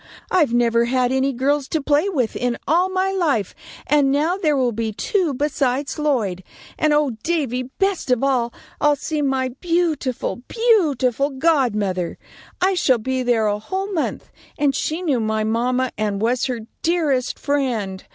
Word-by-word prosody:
I've 330 -9 +3
never 235 -1 +3
had 250 0 +1
any 265 +1 +1
girls 275 +2 0
to 320 - -1
play 295 +6 +2
with 260 - -1
in 245 -1 -1
all 350 +5 +3
my 375 +1 0
life, 300 - 0 0.3
and 285 -2 +3
now 305 +6 +1
there 310 -7 +1
will 250 -2 +2
be 225 0 -2
two 350 - 0
besides 275 0 -1
Lloyd; 220 -12 0 0.3
and, 310 - +1
oh, 295 -2 +3
Davy, 260 -6 -1
best 390 -7 0
of 250 0 +2
all, 250 -4 +1 0.3
I'll 295 0 +4
see 300 +2 -3
my 265 -2 0
beautiful, 315 -2 -1
beautiful 290 - +2
godmother! 235 - 0 0.4
I 375 +2 +3
shall 270 -8 +3
be 260 +3 -2
there 240 -3 +2
a 205 0 0
whole 385 - -4
month, 320 - -3 0.3
and 285 -2 +2
she 315 +6 -2
knew 285 -8 +1
my 220 -1 0
mamma 250 +3 0
and 205 -2 -1
was 240 +4 +1
her 250 -4 -3 0.2
dearest 300 -7 0
friend. 235 -10 -1
270 Hz, 160 wpm, -21 LUFS, 240-310 Hz, 0.4 s, I'll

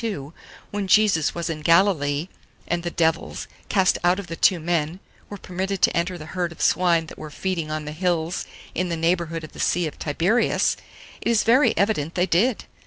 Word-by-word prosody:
32, 160 -10 -4 0.4
when 205 -1 -3
Jesus 190 -6 +3
was 170 -1 -3
in 160 -2 -4
Galilee, 165 -3 +3 0.4
and 175 0 -1
the 175 - -3
devils, 165 -1 -1 0.2
cast 190 -3 +3
out 175 +1 +4
of 200 - -5
the 165 - -6
two 180 +1 +3
men, 165 +1 -1 0.3
were 205 - -7
permitted 190 +1 -3
to - - +3
enter 175 +2 -1
the 155 - -9
herd 175 -2 -1
of 170 - -13
swine 170 -1 +3
that - - -12
were 155 - -7
feeding 170 0 -3
on 155 0 -3
the 150 - -5
hills 170 0 -1 0.3
in 180 0 -1
the 170 - -2
neighbourhood 165 -1 0
of 155 - -9
the - - -13
Sea 175 0 +1
of 155 - -6
Tiberias, 175 +10 +1 0.5
it - - -1
is 230 -2 +3
very 255 +5 +4
evident 175 -7 0
they 180 - +2
did. 200 +7 +1
175 Hz, 200 wpm, -23 LUFS, 160-190 Hz, 0.5 s, out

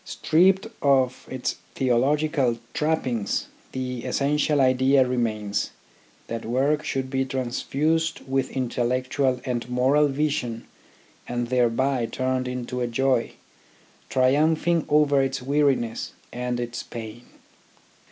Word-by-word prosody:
Stripped 185 +5 +3 0.2
of 130 -3 +2
its 130 -1 -3 0.2
theological 135 0 +2 0.2
trappings, 130 -9 -1 0.2
the 125 -2 -4
essen 140 +3 0
tial 150 0 +2
idea 130 0 +4
remains, 110 -5 -1 0.6
that 115 -1 -5
work 140 +6 +1
should 135 -3 -2
be 135 -1 +1
transfused 145 +5 -1
with 135 0 -1
intellectual 130 +1 0
and 125 -2 -3
moral 135 +4 +3
vision 135 -5 -2 0.6
and 120 -1 -2
thereby 125 0 +1
turned 130 +2 -1
into 125 0 -4
a 120 - 0
joy, 130 0 +1 0.8
triumphing 155 +5 +2
over 145 -2 +4
its 135 0 -1
weariness 135 -3 0 0.2
and 125 0 -2
its 120 0 -4
pain. 115 +1 -9
130 Hz, 110 wpm, -25 LUFS, 120-145 Hz, 0.8 s, idea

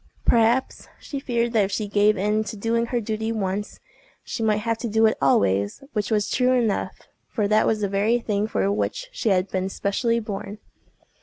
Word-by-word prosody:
Perhaps 235 +2 +2
she 280 - -6
feared 235 -3 -1
that 215 -3 +4
if 195 - -6
she 210 0 -2
gave 210 +1 +3
in 210 +3 +1
to 220 - -6
doing 230 +3 0
her 240 0 -1
duty 220 0 -3
once, 205 -1 -3 0.4
she - - -5
might 215 -1 +1
have 230 -1 0
to 235 - -3
do 220 +1 +3
it 220 - +3
always—which 105 - +1
was 210 -2 +1
true 255 0 +2
enough—for 220 -2 -2
that 215 +1 +3
was 215 -1 +1
the 200 - +1
very 200 +4 +2
thing 210 -3 -1
for 200 -2 0
which - - -2
she 380 - -1
had 185 -1 +2
been 190 0 -1
specially 230 +5 0
born. 210 -1 -6
215 Hz, 185 wpm, -24 LUFS, 200-230 Hz, 0.4 s, that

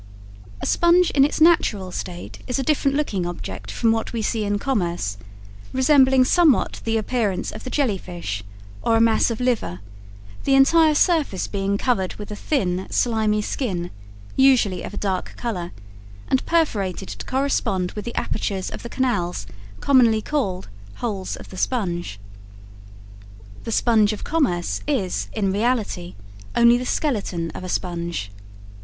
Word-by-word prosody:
A - - -1
sponge 345 +1 +4
in 275 - +4
its 295 - +1
natural 230 - +3
state 175 0 -6
is 250 - -1
a 270 - -1
different 280 -1 +1
looking 210 -11 -1
object 175 - -6
from 230 -2 +1
what 225 +1 -1
we 225 -2 -2
see 220 0 0
in 205 0 0
commerce, 175 - -1 0.6
resembling 260 -1 +5
somewhat 320 -1 +3
the 225 0 +1
appearance 215 -4 -1
of 215 - -9
the - - -5
jelly 250 -9 0
fish, 170 - -5 0.4
or 225 - +2
a - - +4
mass 225 0 +4
of 230 - -3
liver, 245 - -1 0.6
the 270 - +3
entire 310 +3 +5
surface 300 - +2
being 200 0 -1
covered 200 -6 0
with 210 0 -8
a - - -4
thin, 190 - -1
slimy 215 -3 +1
skin, 180 -11 -3 0.4
usually 255 -8 +4
of 205 - -7
a - - -9
dark 190 -2 -2
color, 180 -8 -4 0.6
and 265 - +2
perforated 205 - 0
to - - -6
correspond 255 -9 0
with 210 - -6
the 235 - -6
apertures 195 -3 -2
of - - -7
the 235 - -7
canals 190 - -1 0.4
commonly 240 -5 +4
called 210 -8 -2 0.3
"holes 200 -5 -3
of - - -12
the 185 - -9
sponge." 175 - -2 1.5
The 230 - -3
sponge 220 -2 +3
of 215 - -7
commerce 255 - 0
is, 185 - -1
in 195 -2 0
reality, 210 -5 -1 0.4
only 235 0 +6
the 250 - -4
skeleton 195 - -1
of - - -8
a 185 - -5
sponge. 170 - -3
220 Hz, 155 wpm, -22 LUFS, 185-260 Hz, 1.5 s, only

